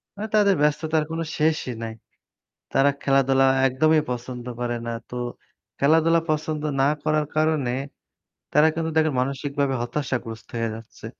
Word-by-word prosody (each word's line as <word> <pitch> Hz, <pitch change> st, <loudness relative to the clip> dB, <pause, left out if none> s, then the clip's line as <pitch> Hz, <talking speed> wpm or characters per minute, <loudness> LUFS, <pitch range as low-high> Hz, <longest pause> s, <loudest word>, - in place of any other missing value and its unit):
মানে 215 Hz, +2 st, -4 dB
তাদের 200 Hz, -2 st, +5 dB
ব্যস্ততার 150 Hz, +1 st, +2 dB
কোনো 165 Hz, 0 st, -2 dB
শেষই 155 Hz, -5 st, +1 dB
নাই। 115 Hz, -1 st, -4 dB, 0.8 s
তারা 140 Hz, +1 st, +4 dB
খেলাধুলা 135 Hz, -1 st, +3 dB, 0.2 s
একদমই 155 Hz, +4 st, +3 dB
পছন্দ 125 Hz, 0 st, -5 dB
করে 120 Hz, -1 st, -1 dB
না 115 Hz, -, -2 dB, 0.2 s
তো -, -, -7 dB, 0.6 s
খেলাধুলা 165 Hz, +3 st, +4 dB
পছন্দ 155 Hz, 0 st, -1 dB, 0.2 s
না 135 Hz, -, +4 dB
করার 155 Hz, -1 st, +1 dB
কারণে, 155 Hz, -5 st, +2 dB, 0.8 s
তারা 150 Hz, +2 st, +6 dB
কিন্তু 160 Hz, 0 st, -2 dB
দেখেন 155 Hz, -2 st, +3 dB
মানসিকভাবে 140 Hz, +1 st, -1 dB
হতাশাগ্রস্ত 120 Hz, -4 st, -4 dB
হয়ে 115 Hz, 0 st, 0 dB
যাচ্ছে। 115 Hz, 0 st, -11 dB
145 Hz, 135 wpm, -24 LUFS, 125-155 Hz, 0.8 s, তারা